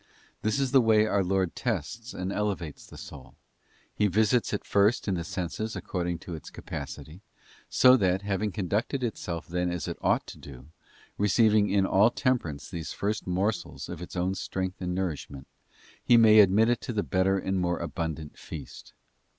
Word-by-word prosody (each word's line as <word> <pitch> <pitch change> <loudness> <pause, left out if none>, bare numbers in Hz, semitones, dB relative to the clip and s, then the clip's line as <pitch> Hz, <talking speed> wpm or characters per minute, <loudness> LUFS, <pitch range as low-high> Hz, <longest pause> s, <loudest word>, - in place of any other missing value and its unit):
This 110 +5 0
is 135 -2 0
the 135 -2 +6
way 110 -2 +4
our 100 -2 +1
Lord 95 -1 0
tests 115 - -3
and 95 +2 -4
elevates 100 -7 -3
the - - -12
soul: 70 -3 -11 0.6
He 105 - +2
visits 110 +4 +2
it 105 - -3
first 100 +4 +2
in 100 - +1
the 85 -2 -2
senses 90 +6 -4
according 90 -2 -3
to 90 - -6
its 80 - -8
capacity; 70 +4 -8 0.5
so 130 0 +6
that, 95 -2 +1
having 100 +1 -1
conducted 105 - -1
itself 90 -7 -4
then 90 +1 -1
as 85 -4 -3
it - - -5
ought - - +2
to - - -11
do, 65 -2 -11 0.5
receiving 105 +1 +4
in 100 -1 +3
all 100 +4 +5
temperance 120 - -1
these 85 -4 -6
first 105 0 -2
morsels 95 +4 -2
for 90 -1 -7
its 90 - -8
own 90 +1 0
strength 95 -1 -4
and 90 -1 -2
nourishment, 75 -7 -4 0.6
He 120 - +6
may 110 -1 +7
admit 105 +3 +5
it 120 - +1
to 120 - -4
the 105 -2 0
better 95 +1 +1
and 95 0 -1
more 85 -1 0
abundant 80 -3 -5
feast. - - -9
95 Hz, 175 wpm, -28 LUFS, 90-110 Hz, 0.6 s, may